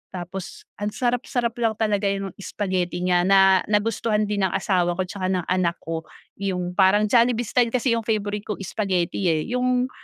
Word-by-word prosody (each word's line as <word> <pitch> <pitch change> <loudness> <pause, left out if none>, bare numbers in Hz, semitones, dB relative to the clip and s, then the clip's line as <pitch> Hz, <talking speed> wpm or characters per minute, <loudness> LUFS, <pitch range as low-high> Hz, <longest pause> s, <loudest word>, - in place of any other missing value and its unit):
tapos 190 - -7 0.2
ang 205 - -2
sarap-sarap 245 -1 0
lang 225 -2 +1
talaga 210 -2 0
yung 195 -1 -3
spaghetti 185 -3 -2
niya 180 -1 +3
na 190 -1 +6
nagustuhan 215 0 +1
din 205 -1 -1
ng - - -6
asawa 175 -3 +1
ko 185 - +1
'tsaka 185 -1 -4
ng 180 -2 0
anak 180 -2 +1
ko, 165 0 -4 0.4
yung 180 -2 -2
parang 200 +2 +4
Jollibee 240 0 +3
style 240 +1 +2
kasi 250 -1 +2
yung 225 - -9
favorite 210 -1 -1
ko 210 - -2
spaghetti, 190 -2 -1
eh, 155 -1 0
yung 250 0 +1
200 Hz, 175 wpm, -23 LUFS, 185-225 Hz, 0.4 s, na